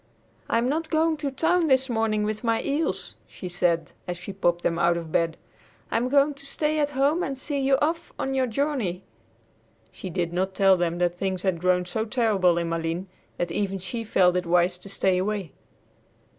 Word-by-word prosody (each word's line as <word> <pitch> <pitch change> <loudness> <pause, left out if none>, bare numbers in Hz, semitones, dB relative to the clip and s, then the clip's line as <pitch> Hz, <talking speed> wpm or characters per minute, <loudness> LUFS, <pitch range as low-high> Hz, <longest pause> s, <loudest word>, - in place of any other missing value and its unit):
"I'm 230 +2 +2
not 315 +4 -1
going 320 0 +2
to 295 -1 -2
town 330 +5 +2
this 265 -2 +3
morning 225 -3 0
with 215 +1 -3
my 230 -1 +1
eels," 280 - -2
she 185 - -8
said 175 -2 0 0.2
as 175 0 -3
she 195 +3 -7
popped 175 -2 0
them 170 0 0
out 170 0 +3
of 165 -2 -6
bed. 165 0 +1 0.5
"I'm 245 +2 +1
going 285 +2 +4
to 280 0 -13
stay 305 +2 0
at 295 -1 +2
home 290 +6 +3
and 275 -5 -3
see 280 +2 -3
you 270 0 +3
off 330 +4 -1
on 270 - -2
your 260 -1 +1
journey!" 230 - -1 0.9
She 190 - -7
did 175 -1 -2
not 190 +2 -1
tell 195 -1 +5
them 175 -1 -1
that 175 0 0
things 190 -2 -2
had 185 -4 0
grown 180 0 +2
so 220 +5 -2
terrible 210 -7 +2
in 170 -1 -1
Malines 165 +2 -2 0.3
that 175 -1 -2
even 195 0 -1
she 195 +5 -5
felt 180 -5 +3
it 180 -1 -1
wise 175 +1 +2
to 200 - -12
stay 190 -2 +1
away. 195 -4 -2
200 Hz, 200 wpm, -25 LUFS, 180-270 Hz, 0.9 s, tell